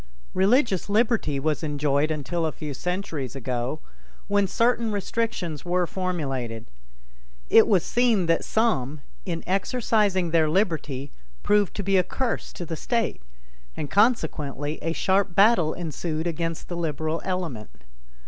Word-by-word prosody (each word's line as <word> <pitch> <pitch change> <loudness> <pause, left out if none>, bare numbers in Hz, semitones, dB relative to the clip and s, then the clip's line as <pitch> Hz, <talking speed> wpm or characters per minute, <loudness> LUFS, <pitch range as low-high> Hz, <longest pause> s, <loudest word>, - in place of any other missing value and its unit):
Religious 200 - +2
liberty 215 - +2
was 150 +2 0
enjoyed 145 -1 +1
until 160 +2 -1
a - - -2
few 150 -2 -6
centuries 165 - -3
ago 125 +2 -3 0.5
when 200 -1 +2
certain 230 +2 +1
restrictions 200 -6 -2
were 180 0 +1
formulated. 135 - -3 0.9
It 225 - +7
was 190 -5 +3
seen 235 -6 +2
that 165 0 +2
some, 155 - 0 0.3
in 170 -2 -3
exercising 195 -2 +1
their 160 -2 +3
liberty, 155 -7 -1 0.3
proved 205 -2 +2
to 200 - -3
be 195 0 +3
a 185 - +4
curse 245 +6 -3
to 175 - -6
the 165 - -4
state, 230 - -1 0.6
and 145 - -4
consequently 155 - +1
a 165 - -1
sharp 190 0 +1
battle 195 -6 +4
ensued 160 -1 -3
against 165 -1 -3
the 175 - -5
liberal 160 0 -2
element. 150 - -4
175 Hz, 135 wpm, -25 LUFS, 150-200 Hz, 0.9 s, It